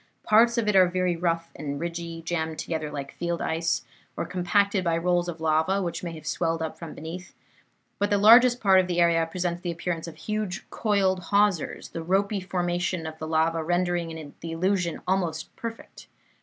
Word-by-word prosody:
Parts 230 +3 +5
of 230 -2 +1
it 210 - +2
are 185 -1 +7
very 180 -1 0
rough 165 -1 -1
and 140 -2 -4
ridgy, 170 0 -5
jammed 160 -2 -2
together 160 -2 -3
like 140 -2 -6
field 170 0 -2
ice, 165 +1 -1 0.3
or - - -1
compacted 200 +2 +1
by 165 -2 +1
rolls 175 +1 +1
of 165 -1 -6
lava, 160 +4 +2
which 175 -3 -3
may 170 -2 -5
have 155 -2 -10
swelled 165 +1 -1
up 160 -1 -4
from 165 -2 -8
beneath; 175 +3 -8 0.6
but 205 0 +1
the 205 - +3
largest 240 +4 +7
part 195 -2 +5
of 185 - +1
the 175 -1 -1
area 170 -1 +4
presents 175 0 -2
the 175 - -3
appearance 170 0 -3
of 165 - -8
huge 210 -3 -4
coiled 190 -4 +1
hawsers, 200 -4 +1
the 165 - -5
ropy 195 +4 +1
formation 180 -2 -2
of 160 0 -7
the 155 - -5
lava 160 +1 +1
rendering 170 -3 -1
the 165 - -6
illusion 180 0 0
almost 170 -4 -1
perfect. 230 -3 -8
175 Hz, 185 wpm, -26 LUFS, 165-190 Hz, 0.6 s, are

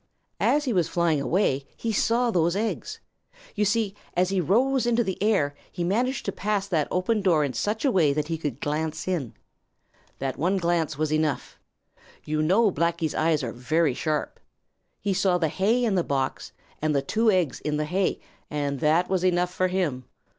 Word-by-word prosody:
As 295 +1 +2
he 250 - 0
was 175 -5 +2
flying 165 -4 +1
away 140 -5 0
he 225 -1 -2
saw 235 +3 +2
those 170 -2 +2
eggs. 220 +2 -3 0.5
You 210 -1 +1
see, 205 0 +1 0.2
as 180 +1 +2
he 195 -1 +1
rose 245 - +2
into 240 0 +3
the 190 -3 -4
air, 195 -10 +2 0.2
he 175 - -3
managed 240 +9 0
to - - -1
pass 205 -1 -1
that 160 -6 0
open 205 +4 0
door 170 -6 +3
in 140 -3 -2
such 215 - -1
a 270 - +4
way 165 -9 +3
that 150 +1 -1
he 165 - -1
could 145 -5 -4
glance 155 +3 -2
in. 165 -11 -2 0.8
That 135 -1 -4
one 180 +6 +1
glance 170 -4 0
was 155 0 0
enough. 155 -1 -1 0.7
You 155 0 -1
know 195 +7 +3
Blacky's 170 -1 0
eyes 155 -2 +1
are 115 - -3
very 150 +4 +1
sharp. 155 +3 -2 0.6
He 200 -1 -1
saw 190 -1 +2
the 165 -3 0
hay 225 +9 +1
in 220 - +1
the 180 -3 +2
box 135 -3 -2 0.3
and 155 -1 +1
the 140 - +1
two 220 +9 +2
eggs 180 -9 +1
in 150 -1 -1
the 150 - -1
hay, 185 +4 0 0.3
and 145 -2 -2
that 160 +5 +3
was 185 -1 0
enough 180 -1 +1
for 185 0 +1
him. 170 -9 -1
175 Hz, 190 wpm, -25 LUFS, 150-200 Hz, 0.8 s, a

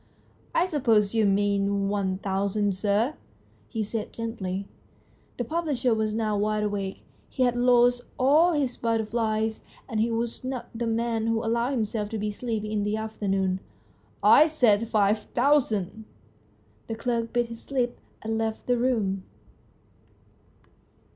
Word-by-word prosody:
" - - -27
I - - +3
suppose 230 - +2
you 220 -2 +3
mean 200 0 +1
one 195 -2 -1
thousand, 200 +1 0
sir? 205 +7 +1 0.3
" - - -33
he 220 -2 -2
said 215 +1 -4
gently. 200 -4 -4 0.7
The 245 - -1
publisher 280 -4 0
was 215 -1 0
now 215 -2 0
wide 210 +1 0
awake. 200 -2 -3 0.3
He 260 - 0
had 245 -1 +2
lost 245 0 +4
all 305 +7 +5
his 275 -5 0
butter 225 -1 0
flies, 220 -1 -1 0.2
and 225 -4 -2
he 225 +2 +2
was 230 +1 -3
not 255 -1 -4
the 235 0 -3
man 225 0 0
to 225 0 0
allow 235 +2 +1
himself 215 -5 -2
to 225 - -3
be 210 0 -2
sleepy 215 -1 -3
in 210 -1 0
the 210 +1 0
afternoon. 195 -4 -1 0.4
" - - -34 0.2
I 310 - +7
said 230 -8 +3
five 210 0 +3 0.2
thousand! 220 -6 +1 0.4
" 105 0 -35
The 225 - -3
clerk 230 0 -2
bit 240 -1 0
his 230 -1 -10
lip 250 -3 -1 0.2
and 220 0 -1
left 220 -1 -2
the 245 -1 +1
room. 215 -6 0
225 Hz, 155 wpm, -26 LUFS, 205-240 Hz, 0.7 s, I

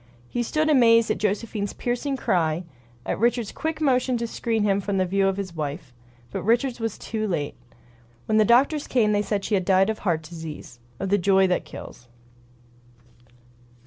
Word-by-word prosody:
He 240 - -2
stood 310 +6 0
amazed 230 -6 +5
at - - -1
Josephine's 205 0 -2
piercing 250 +3 -2
cry; 170 -6 0 0.4
at - - -2
Richards' 235 -1 +1
quick 320 0 -3
motion 255 -4 +2
to 235 - -2
screen 225 -1 -1
him 200 -1 +2
from 200 0 -2
the 185 - +2
view 195 +2 +1
of 195 0 0
his 190 -4 -5
wife. 145 -4 -5 0.4
But - - -3
Richards 240 +3 +1
was 225 -2 -3
too 215 -1 -3
late. 155 -7 -2 0.7
When 215 0 +2
the - - +6
doctors 275 +7 +3
came 225 -5 +2
they 205 0 +2
said 205 -1 -2
she - - -2
had 190 -2 +2
died 190 +3 +3
of 220 - -6
heart 165 -5 -1
disease 155 -6 -9
— 120 - -30
of 195 - -2
the 205 +1 +3
joy 190 +1 +4
that 180 -1 0
kills. 120 - -11
205 Hz, 185 wpm, -24 LUFS, 185-235 Hz, 0.7 s, the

